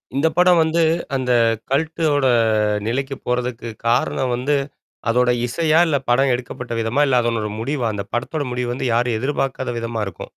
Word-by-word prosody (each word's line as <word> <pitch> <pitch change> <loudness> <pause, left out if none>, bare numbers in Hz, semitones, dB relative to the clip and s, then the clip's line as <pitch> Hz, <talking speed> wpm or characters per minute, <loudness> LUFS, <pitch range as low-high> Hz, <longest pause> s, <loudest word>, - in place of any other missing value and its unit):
இந்த 140 +4 +2
படம் 180 -1 +5
வந்து 160 +1 +1 0.3
அந்த 130 -1 -1 0.4
கல்ட்டோட 155 -1 +1 0.6
நிலைக்கு 135 +3 -2
போறதுக்கு 125 -1 -2 0.2
காரணம் 125 +2 +1
வந்து. 135 +4 0 0.5
அதோட 125 +1 +3 0.2
இசையா, 160 +5 +2
இல்ல 150 -3 +2
படம் 135 +2 +3
எடுக்கப்பட்ட 125 0 -5
விதமா? 115 +6 0
இல்ல 130 -2 +3
அதனோட 115 -2 -1
முடிவா? 125 +1 -1
அந்த 100 -1 -4
படத்தோட 145 +5 -2
முடிவு 125 -1 -2
வந்து, 130 +1 -2
யாரும் 120 -1 +1
எதிர்பார்க்காத 130 -2 -2
விதமா 115 -1 -3
இருக்கும். 95 - -8
125 Hz, 150 wpm, -20 LUFS, 120-145 Hz, 0.6 s, படம்